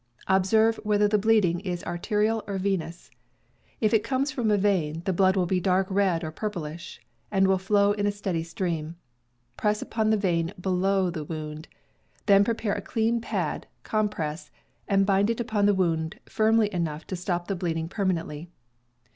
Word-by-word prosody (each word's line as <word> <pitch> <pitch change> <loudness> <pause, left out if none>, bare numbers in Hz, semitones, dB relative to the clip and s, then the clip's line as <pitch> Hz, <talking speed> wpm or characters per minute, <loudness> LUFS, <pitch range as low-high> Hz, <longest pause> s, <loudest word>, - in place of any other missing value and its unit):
Observe 220 +4 +3
whether 210 -1 +2
the 210 0 +2
bleeding 200 -5 +3
is 180 -2 -4
arterial 210 +5 0
or 200 -1 -2
venous. 185 -3 -3 0.7
If 215 -1 +2
it 220 - +4
comes 275 +2 0
from 245 -7 -1
a 210 - +4
vein, 170 -6 0
the 190 - +1
blood 190 +1 +3
will 185 - +2
be 185 +1 +1
dark 185 +1 +2
red 190 -4 +1
or 155 - -4
purplish, 170 -4 -6 0.3
and 195 -1 +3
will 190 -1 +3
flow 200 +1 +3
in 205 0 0
a - - +2
steady 195 -5 -2
stream. 165 -1 -3 0.6
Press 210 0 +1
upon 220 -1 -1
the 220 - +3
vein 175 -3 0
below 190 0 +1
the 160 -3 -5
wound; 155 +1 -6 0.6
then 200 -1 +6
prepare 225 -1 -1
a - - -3
clean 230 +1 0
pad - - -3 0.2
(compress) 180 -8 -2 0.4
and 195 -1 +3
bind 200 +1 +2
it 230 - -1
upon 215 -3 +1
the 205 - +4
wound 165 +2 0
firmly 220 -1 +2
enough 160 -3 -3
to 185 - -4
stop 175 -1 -3
the 195 - -1
bleeding 165 -3 -2
permanently. 170 -4 -2
195 Hz, 170 wpm, -26 LUFS, 170-210 Hz, 0.7 s, then